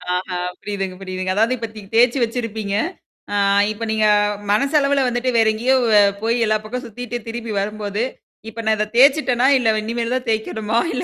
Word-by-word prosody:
ஆஹா 180 Hz, 0 st, -3 dB, 0.2 s
புரியுதுங்க, 195 Hz, -2 st, -4 dB
புரியுதுங்க. 185 Hz, 0 st, -3 dB
அதாவது 225 Hz, +5 st, +2 dB
இப்பத்தக்கு 220 Hz, -3 st, -9 dB
தேய்ச்சு 245 Hz, +3 st, +4 dB
வச்சிருப்பீங்க. 225 Hz, -3 st, -3 dB, 0.6 s
ஆ -, -, 0 dB, 0.4 s
இப்ப 215 Hz, +2 st, -6 dB
நீங்க 220 Hz, 0 st, +1 dB, 0.5 s
மனச 275 Hz, +7 st, +2 dB
அளவுல 275 Hz, -1 st, +2 dB
வந்துட்டு 245 Hz, +1 st, -1 dB
வேற 225 Hz, -1 st, +4 dB
எங்கேயோ 245 Hz, +5 st, +1 dB, 0.2 s
வ 210 Hz, -, +6 dB, 0.2 s
போய் 230 Hz, +2 st, +1 dB
எல்லா 215 Hz, 0 st, +2 dB
பக்கம் 250 Hz, +4 st, -5 dB
சுத்திட்டு 240 Hz, +1 st, -6 dB
திரும்பி 230 Hz, 0 st, -5 dB
வரும்போது, 205 Hz, +1 st, -3 dB, 0.5 s
இப்ப 225 Hz, +1 st, -7 dB
நான் 220 Hz, 0 st, +3 dB
இத 210 Hz, -, 0 dB
தேய்சுட்டேனா, 260 Hz, -1 st, +4 dB
இல்ல 225 Hz, -4 st, +2 dB
இனிமேல் 230 Hz, +2 st, -2 dB
தான் 255 Hz, 0 st, -3 dB
தேய்க்கணுமா? 220 Hz, 0 st, -1 dB, 0.2 s
இல்ல -, -, -2 dB
225 Hz, 170 wpm, -20 LUFS, 210-245 Hz, 0.6 s, வ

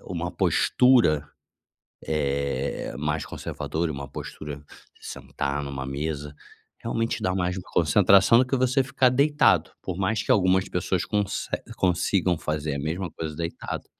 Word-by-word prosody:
uma 85 Hz, -1 st, -4 dB
postura, 90 Hz, -, +3 dB, 0.8 s
eh, 70 Hz, -4 st, -2 dB
mais 75 Hz, +1 st, -1 dB
conservadora, 80 Hz, +1 st, -4 dB
e -, -, -4 dB
uma 70 Hz, 0 st, -7 dB
postura 75 Hz, +1 st, -7 dB, 0.4 s
de -, -, -12 dB
sentar 70 Hz, +1 st, -4 dB
em -, -, -6 dB
uma 65 Hz, -1 st, -5 dB
mesa, 75 Hz, +1 st, -4 dB, 0.4 s
realmente 115 Hz, 0 st, -2 dB
dá 95 Hz, -, +1 dB
mais 90 Hz, 0 st, -1 dB
uma 90 Hz, -, -8 dB
concentração 95 Hz, +6 st, +5 dB
do 130 Hz, -, +3 dB
que 135 Hz, +1 st, 0 dB
você 130 Hz, +1 st, +2 dB
ficar 130 Hz, -1 st, +2 dB
deitado, 145 Hz, +2 st, +3 dB
por 90 Hz, -, -4 dB
mais 100 Hz, +3 st, 0 dB
que -, -, +2 dB
algumas 95 Hz, -1 st, +3 dB
pessoas 90 Hz, 0 st, -1 dB
conse 105 Hz, -2 st, -2 dB, 0.3 s
consigam 90 Hz, 0 st, +1 dB
fazer 75 Hz, -1 st, -2 dB
a -, -, -4 dB
mesma 80 Hz, +6 st, -3 dB
coisa 80 Hz, -2 st, -6 dB
deitado. 85 Hz, 0 st, -5 dB
85 Hz, 150 wpm, -25 LUFS, 75-100 Hz, 0.8 s, concentração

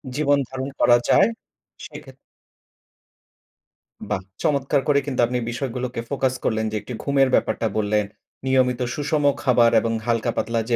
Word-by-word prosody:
জীবন 145 Hz, -1 st, +2 dB
ধারণ 130 Hz, +1 st, -5 dB
করা 120 Hz, -, +6 dB
যায় -, -, +5 dB, 0.6 s
সেক্ষেত -, -, -11 dB, 1.9 s
বাহ! 95 Hz, -, -1 dB, 0.2 s
চমৎকার 140 Hz, -2 st, +1 dB
করে 140 Hz, -1 st, +4 dB
কিন্তু 135 Hz, -3 st, -4 dB
আপনি 125 Hz, +1 st, -2 dB
বিষয়গুলোকে 125 Hz, -1 st, -4 dB
ফোকাস 135 Hz, -2 st, 0 dB
করলেন 110 Hz, 0 st, 0 dB
যে, -, -, -4 dB
একটু 125 Hz, -, -8 dB
ঘুমের 140 Hz, -2 st, +2 dB
ব্যাপারটা 115 Hz, -, 0 dB
বললেন, 105 Hz, 0 st, +1 dB, 0.4 s
নিয়মিত 130 Hz, -1 st, +2 dB, 0.2 s
সুষম 150 Hz, 0 st, -1 dB, 0.2 s
খাবার 120 Hz, -3 st, +4 dB
এবং 115 Hz, 0 st, -2 dB
হালকা 115 Hz, 0 st, 0 dB
পাতলা 115 Hz, -1 st, 0 dB
যে 120 Hz, -, +3 dB
125 Hz, 140 wpm, -22 LUFS, 115-140 Hz, 1.9 s, করা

